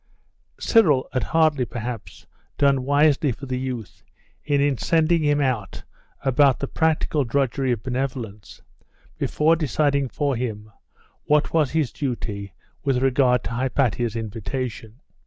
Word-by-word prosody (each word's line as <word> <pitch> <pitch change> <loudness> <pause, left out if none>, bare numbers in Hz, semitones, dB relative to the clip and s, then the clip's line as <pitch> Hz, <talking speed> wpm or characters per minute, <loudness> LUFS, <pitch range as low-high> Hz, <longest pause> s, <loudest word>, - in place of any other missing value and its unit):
Cyril 155 - +3
had 130 - +1
hardly, 155 -5 +2
perhaps, 120 -1 -6 0.3
done 140 -2 +2
wisely 145 0 +3
for 135 +4 -7
the 130 -1 -3
youth 125 -6 -6 0.4
in 145 -1 +2
sending 165 0 +2
him 145 0 +2
out 125 -9 -2 0.4
about 135 0 +4
the 140 - -3
practical 155 -1 +1
drudgery 135 +1 0
of 110 -3 -2
benevolence, 125 -5 -5 0.6
before 160 +2 +2
deciding 140 -2 0
for 145 -1 -1
him 110 -3 -4 0.5
what 150 0 +2
was 155 -4 +3
his 155 -3 0
duty 105 -7 -4 0.3
with 135 -3 +1
regard 130 -2 +3
to 95 - -5
Hypatia's 120 -2 0
invitation. 115 +2 -5
130 Hz, 125 wpm, -23 LUFS, 120-145 Hz, 0.6 s, about